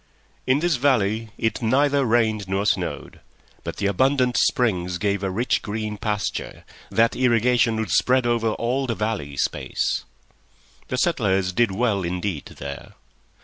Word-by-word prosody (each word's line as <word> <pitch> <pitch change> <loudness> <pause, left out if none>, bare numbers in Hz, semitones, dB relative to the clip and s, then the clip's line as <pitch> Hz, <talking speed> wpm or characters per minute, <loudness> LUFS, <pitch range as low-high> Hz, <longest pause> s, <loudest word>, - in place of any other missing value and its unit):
In 130 +3 +3
this 175 -4 +2
valley 115 -4 +1
it 115 +2 -1
neither 140 +4 +2
rained 110 -4 +1
nor 95 +1 0
snowed, - - -2 0.4
but - - -6
the - - -2
abundant 125 +5 +2
springs 90 -7 +1
gave 100 0 0
a 95 - -1
rich 115 +7 0
green 105 0 -4
pasture, 105 -2 -3 0.2
that 115 +1 +2
irrigation 120 -1 +3
would 110 -5 -2
spread 125 +8 +3
over 115 -1 +1
all 130 +4 -1
the 115 - -1
valley 105 -11 -3
space. - - -1 0.8
The 125 - -3
settlers 95 - +1
did 120 +2 +3
well 100 0 0
indeed 90 -2 -3
there. 70 0 -8
110 Hz, 145 wpm, -23 LUFS, 100-125 Hz, 0.8 s, In